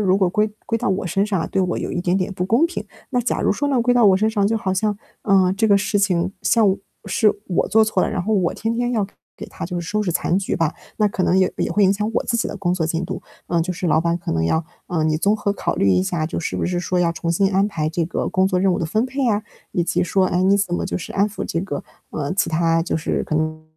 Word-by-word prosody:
如 190 -2 +3
果 190 -3 +3
归 210 +4 +1 0.2
归 230 - 0
到 - - -1
我 190 -1 -1
身 195 +4 +1
上 200 -4 -1
啊， - - -3
对 190 - 0
我 180 -1 -1
有 - - -4
一 175 - -1
点 180 +1 +1
点 190 +1 -1
不 180 - -2
公 230 - +3
平。 340 - -5 0.3
那 250 - +1
假 245 - -1
如 - - +2
说 285 - -1
呢 265 -3 +2
归 245 +1 +2
到 240 -2 +5
我 195 -2 +6
身 215 +3 +2
上， 210 -2 +1
就 225 - +1
好 190 -2 -1
像， 205 +1 0 0.2
嗯， 190 -2 +3
这 220 +3 +1
个 200 -1 +5
事 205 +1 0
情 185 -2 +1
像 210 -5 +3 0.3
是 215 -2 +3
我 180 - 0
做 220 0 +5
错 215 - +1
了， - - 0
然 215 - -1
后 215 +5 0
我 185 -4 +1
天 225 +1 -2
天 245 +1 0
要 215 -4 +1
给 195 - -14 0.2
给 - - -8
他 - - -7
就 180 0 -4
收 210 +6 -1
拾 185 - -1
残 175 +1 0
局 195 - -2
吧， 165 -2 0 0.2
那 210 - +3
可 195 - -2
能 185 +1 +3
也 185 -1 +3
也 - - 0
会 205 - +3
影 190 - +5
响 210 +2 -2
我 - - +1
自 235 - 0
己 - - 0
的 - - -6
工 180 -3 0
作 165 -3 -1
进 165 +2 -2
度， - - -5 0.3
嗯， 170 -1 +1
就 180 - -3
是 180 +1 -3
老 155 -1 +3
板 170 0 0
可 175 - -4
能 80 0 0
要 160 - +1 0.2
嗯， 160 -3 0
你 155 - +1
综 205 +5 +2
合 205 -1 -1
考 - - -2
虑 100 - +3
一 90 0 +3
下， 155 - -1
就 165 - -4
是 165 - -3
不 - - -1
是 180 0 -1
说 180 +1 -1
要 175 -1 +2
重 165 0 -3
新 195 +3 +2
安 195 +2 +3
排 155 -7 -2
这 165 +1 -1
个 180 - -2
工 185 0 +2
作 185 -2 +1
任 190 0 +3
务 - - -1
的 - - -1
分 215 +8 +1
配 265 +1 -1
啊， 210 -1 +1 0.3
以 175 - +1
及 - - +1
说， 185 +2 +2
哎， 180 0 +1
你 195 +2 +4
怎 195 -3 0
么 - - -2
就 - - -2
是 175 - -6
安 200 +1 +2
抚 210 - -6
这 165 - -2
个， 175 -6 -4 0.3
呃， 145 -2 -3
其 185 - +1
他 165 0 +2
就 165 - -1
是 155 - -1
可 - - -3
能， 155 0 -1
190 Hz, 325 characters per minute, -21 LUFS, 170-210 Hz, 0.3 s, 我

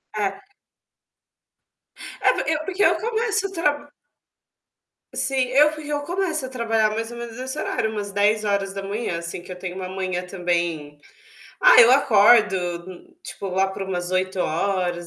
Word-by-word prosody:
É. 200 - -3 1.7
É - - +4
por - - -3
eu 315 - +2
é 310 - -6
porque 385 +1 -1
eu - - +5
começo 450 -3 -1
a - - -13
tra 295 -5 -1 1.3
Sim, 270 0 -1
eu 295 +4 +4
porque 305 -1 -8
eu 290 0 -1
começo 325 -2 -2
a - - -7
trabalhar 225 -4 0
mais 225 +2 -4
ou 240 - -8
menos 235 -1 -7
nesse 260 +3 -6
horário, 220 -7 -1
umas 205 -2 -5
10h, 200 -1 -1
assim, 170 +1 -6
que 180 - -12
eu - - -6
tenho 180 0 -6
uma 185 -1 -5
manhã 185 -1 -3
também 170 -5 -2 0.6
ah, - - +7
eu 235 - +6
acordo, 215 -5 +5 0.7
tipo, 195 +2 -7
lá 190 +1 +1
por 190 0 -6
umas 180 -2 -3
8h, 185 -1 -1
210 Hz, 155 wpm, -23 LUFS, 185-275 Hz, 1.7 s, ah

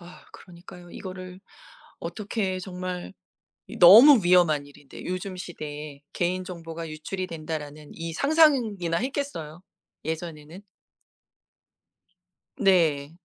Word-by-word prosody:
아, 175 0 -14
그러니까요. 175 0 -14
이거를 185 0 -9 0.6
어떻게 190 +2 -3
정말 180 - -6 0.6
이 - - -9
너무 225 +9 +9
위험한 170 -5 +3
일인데 145 -1 -13
요즘 185 +1 -4
시대에 150 -5 -8
'개인 180 +1 -1
정보가 165 -2 -7
유출이 185 +5 -5
된다.'라는 155 -2 -7
이 165 0 -6
상상이나 245 - +2
했겠어요? 225 - -5 0.4
예전에는? 160 +1 -6 2.0
네. 165 - +2
175 Hz, 245 characters per minute, -25 LUFS, 160-185 Hz, 2.0 s, 너무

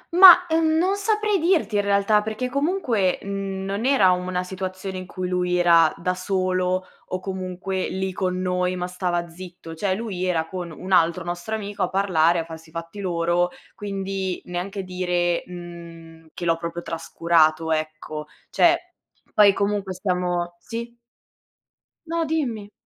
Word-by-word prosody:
Ma, 360 -1 +10
ehm, 320 -1 +2
non 370 +4 +2
saprei 425 0 +1
dirti 320 - +2
in - - +4
realtà, 200 +1 +3
perché 220 +4 -3
comunque, 255 - +1
n 195 -1 -4
non 200 +3 -3
era 255 -8 +5
una 180 0 -1
situazione 185 0 -5
in 185 - -8
cui 185 -1 -4
lui 180 0 0
era 170 -2 +5
da 180 +2 -1
solo 185 0 0 0.2
o 185 - -3
comunque 185 0 -3
lì 190 0 -2
con 185 -1 -1
noi, 180 0 0
ma 180 0 -2
stava 180 -1 -2
zitto. 170 -1 -10
Cioè, 185 +4 -1
lui 200 -4 -4
era 170 -3 +1
con 180 -1 -5
un 180 +4 -8
altro 170 -1 +3
nostro 175 +5 -4
amico 205 -1 -5
a - - +2
parlare, 175 -4 +3
a 165 - -3
farsi 160 0 -11
i - - -20
fatti 165 +4 -7
loro, 175 -1 +1 0.2
quindi 195 -2 -3
neanche 190 +3 -4
dire, 180 -1 0
mhmm, 170 -2 -10
che 175 - -5
l'ho 165 -1 +2
proprio 170 +1 -5
trascurato, 165 -1 +1
ecco. 155 -1 -3 0.2
Cioè, 345 +1 +3 0.4
poi 205 -1 +7
comunque 200 -1 -1
stiamo 180 -2 -1
sì? 235 +5 -6 1.1
No, 330 0 -1
dimmi. 245 -10 -2
185 Hz, 155 wpm, -23 LUFS, 175-205 Hz, 1.1 s, Ma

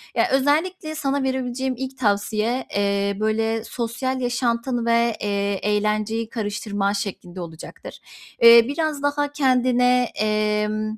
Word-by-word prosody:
Ya, - - +3
özellikle 310 +4 0
sana 280 -2 -1
verebileceğim 260 0 -2
ilk 265 +1 -6
tavsiye, 215 +2 0
eee, 200 0 0
böyle 225 +1 0
sosyal 245 +3 -3
yaşantını 245 0 -1
ve, 235 -1 +2
eee, 200 -1 -1
eğlenceyi 215 +2 0
karıştırman 205 -2 -2
şeklinde 185 -3 -5
olacaktır. 165 -2 -10 0.4
Eee, 235 0 +9
biraz 300 0 -2
daha 290 0 0
kendine, 250 -2 +3
emm 215 0 -1
230 Hz, 115 wpm, -22 LUFS, 210-260 Hz, 0.4 s, Eee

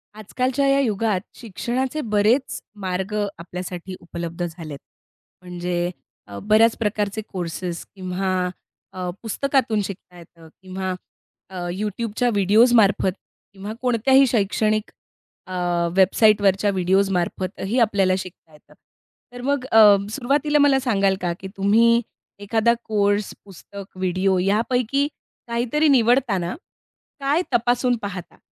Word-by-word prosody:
आजकालच्या 255 +6 -1
या 275 0 +3
युगात 215 -6 0
शिक्षणाचे 250 +6 -3
बरेच 220 +3 +1 0.2
मार्ग 190 +2 -3 0.2
आपल्यासाठी 180 +1 -7
उपलब्ध 170 0 -6
झालेत. 160 -4 -9 0.6
म्हणजे 175 -1 -3 0.4
अ, 100 - -8
बऱ्याच 220 +2 +4
प्रकारचे 210 -1 -2
कोर्सेस 175 -1 -5
किंवा 185 -1 -2 0.5
अ, 185 -1 -4
पुस्तकातून 235 -1 0
शिकता 185 -2 -9
येतं 165 -1 -16
किंवा 185 0 -4 0.6
अ, 190 - -11 0.2
YouTubeच्या 220 +3 -1
व्हिडिओजमार्फत 205 0 +4 0.4
किंवा 200 +2 -7
कोणत्याही 255 +2 +4
शैक्षणिक 215 -1 0 0.6
अ, 185 - -7 0.4
वेबसाईटवरच्या 200 +1 +4
व्हिडिओजमार्फतही 190 +3 0
आपल्याला 200 -5 +2
शिकता 185 -3 -10
येतं. 150 - -20 0.6
तर 245 - -8
मग 275 0 -1
अ, 225 - +6 0.3
सुरुवातीला 285 +5 +1
मला 285 -2 +4
सांगाल 200 -7 +1
का, 175 -1 -1
की 190 - -7
तुम्ही 230 +4 +4 0.4
एखादा 220 +3 +2
कोर्स, 205 -1 0
पुस्तक, 200 +1 -11
व्हिडिओ 185 +1 +1
यापैकी 240 +8 +1 0.4
काहीतरी 240 +6 +1
निवडताना 235 -8 +2 0.6
काय 285 +4 +1
तपासून 245 +1 +2
पाहता? 190 -3 -7
205 Hz, 105 wpm, -22 LUFS, 185-240 Hz, 0.6 s, अ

